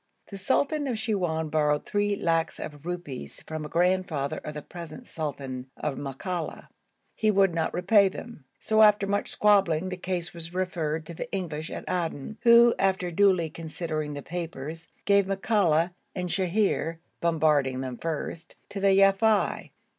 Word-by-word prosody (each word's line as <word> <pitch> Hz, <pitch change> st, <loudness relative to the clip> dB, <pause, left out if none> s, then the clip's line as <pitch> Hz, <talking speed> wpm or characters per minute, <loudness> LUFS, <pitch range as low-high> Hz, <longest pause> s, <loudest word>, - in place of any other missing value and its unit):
The 200 Hz, -, -6 dB
sultan 280 Hz, +7 st, +1 dB
of 245 Hz, -4 st, -1 dB
Siwoun 175 Hz, -8 st, -1 dB
borrowed 150 Hz, -1 st, +1 dB
three 205 Hz, 0 st, 0 dB
lacs 165 Hz, -3 st, 0 dB
of 150 Hz, +2 st, -8 dB
rupees 160 Hz, -, -6 dB
from 155 Hz, 0 st, -5 dB
the 150 Hz, -, -6 dB
grandfather 175 Hz, -5 st, +1 dB
of 150 Hz, -, -7 dB
the 150 Hz, -, -6 dB
present 175 Hz, +8 st, -9 dB
sultan 135 Hz, -5 st, -5 dB
of 150 Hz, -3 st, -2 dB
Makalla; 150 Hz, +6 st, -5 dB, 0.4 s
he 215 Hz, -, +1 dB
would 195 Hz, -3 st, +4 dB
not 165 Hz, -1 st, 0 dB
repay 195 Hz, +2 st, +4 dB
them, 205 Hz, -, -10 dB
so 220 Hz, 0 st, +2 dB
after 210 Hz, -2 st, +6 dB
much 200 Hz, +1 st, -1 dB
squabbling 190 Hz, -5 st, +3 dB
the 185 Hz, -, -4 dB
case 180 Hz, -2 st, -3 dB
was 170 Hz, 0 st, -7 dB
referred 165 Hz, -4 st, -2 dB
to 170 Hz, -, -8 dB
the 245 Hz, +9 st, -6 dB
English 165 Hz, -5 st, -3 dB
at -, -, -7 dB
Aden, 175 Hz, +2 st, -3 dB
who, 235 Hz, 0 st, +7 dB
after 190 Hz, -2 st, +1 dB
duly 180 Hz, -3 st, +3 dB
considering 155 Hz, -2 st, -4 dB
the 145 Hz, -, -6 dB
papers, 165 Hz, -2 st, -6 dB, 0.2 s
gave 200 Hz, -1 st, +4 dB
Makalla 190 Hz, -4 st, +2 dB, 0.2 s
and 180 Hz, -1 st, -3 dB
Sheher 180 Hz, -2 st, 0 dB, 0.2 s
(bombarding 150 Hz, -6 st, +2 dB
them 130 Hz, -2 st, -5 dB
first) 165 Hz, 0 st, -4 dB
to 200 Hz, -, -5 dB
the 195 Hz, 0 st, +4 dB
Yafei. 195 Hz, +2 st, +3 dB
175 Hz, 155 wpm, -27 LUFS, 155-195 Hz, 0.4 s, who